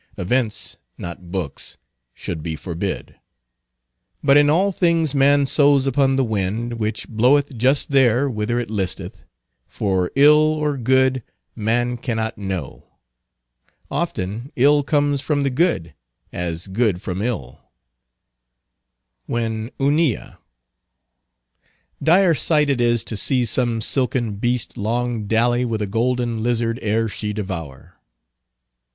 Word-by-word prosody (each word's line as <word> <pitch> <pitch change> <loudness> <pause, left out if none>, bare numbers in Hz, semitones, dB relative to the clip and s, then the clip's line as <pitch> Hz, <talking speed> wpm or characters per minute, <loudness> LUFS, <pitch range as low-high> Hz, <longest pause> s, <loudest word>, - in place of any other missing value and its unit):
Events, 115 +3 -1 0.2
not 85 +1 -7
books, 90 -8 -5 0.4
should 85 -3 -5
be 80 0 -4
forbid. 90 +3 -5 1.1
But 140 -1 +5
in 145 0 +5
all 185 +6 +3
things 165 -5 +1
man 140 0 +4
sows 140 -1 +4
upon 135 0 +2
the 135 - +2
wind, 110 +2 -2
which 110 0 -3
bloweth 130 +5 +2
just 130 +5 +1
there 130 0 +4
whither 115 -1 -2
it 120 -3 -3
listeth; 95 -4 -4 0.4
for 95 -3 -1
ill 150 +2 +7
or 155 -1 +1
good, 130 +1 +2 0.3
man 120 +3 0
cannot 115 -2 -3
know. 95 -8 -6 1.0
Often 105 +8 -3
ill 145 +3 +4
comes 145 -1 +1
from 145 -1 0
the 140 - 0
good, 125 - 0 0.4
as 85 -1 -3
good 100 -1 0
from 95 0 -4
ill. 105 - -4 1.7
When 110 -1 -2
Hunilla— 145 -2 0 1.6
Dire 175 +2 +4
sight 150 -1 +2
it 125 -3 0
is 120 -1 +2
to 110 - -5
see 125 +4 +1
some 115 0 +1
silken 120 -3 0
beast 120 +2 -1
long 115 0 -2
dally 120 +3 +2
with 115 -3 -2
a 105 - -1
golden 120 +2 -1
lizard 115 0 0
ere 110 +1 0
she 105 -1 -4
devour. 85 -10 -7
120 Hz, 120 wpm, -21 LUFS, 105-140 Hz, 1.7 s, ill